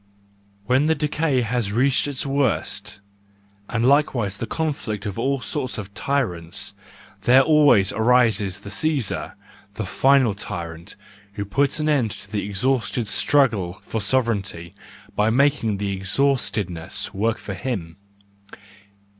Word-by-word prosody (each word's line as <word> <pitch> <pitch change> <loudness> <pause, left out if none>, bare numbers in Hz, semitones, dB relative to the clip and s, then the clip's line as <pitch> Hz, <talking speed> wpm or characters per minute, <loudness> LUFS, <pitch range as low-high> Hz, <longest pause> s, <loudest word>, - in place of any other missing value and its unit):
When 130 +6 +2
the 160 - +3
decay 150 -2 0
has 115 -3 -1
reached 130 +6 +2
its 140 -1 -2
worst, 135 -6 -1 0.7
and 115 0 0
likewise 125 -7 +2
the 115 - -4
conflict 130 - -3
of 105 +1 -4
all 135 +3 0
sorts 135 -4 -3
of 100 -2 -7
tyrants, 95 -11 -2 0.5
there 130 +2 +6
always 145 -10 +4
arises 110 -5 +2
the 100 - -7
Caesar, 145 -5 0 0.4
the 110 - -3
final 130 +4 +3
tyrant, 85 -2 -7 0.4
who 100 0 -4
puts 140 +8 +1
an 155 - 0
end 140 -7 +2
to 100 0 -10
the 105 -2 -2
exhausted 115 +2 -1
struggle 110 -7 +2
for 110 - -3
sove 130 +6 +3
reignty, 95 -7 -4 0.4
by 105 +1 +2
making 125 -4 +2
the 100 0 -2
exhaustedness 100 -5 -1
work 110 +3 0
for 100 - -7
him. 90 -6 -4
115 Hz, 130 wpm, -22 LUFS, 100-135 Hz, 0.7 s, there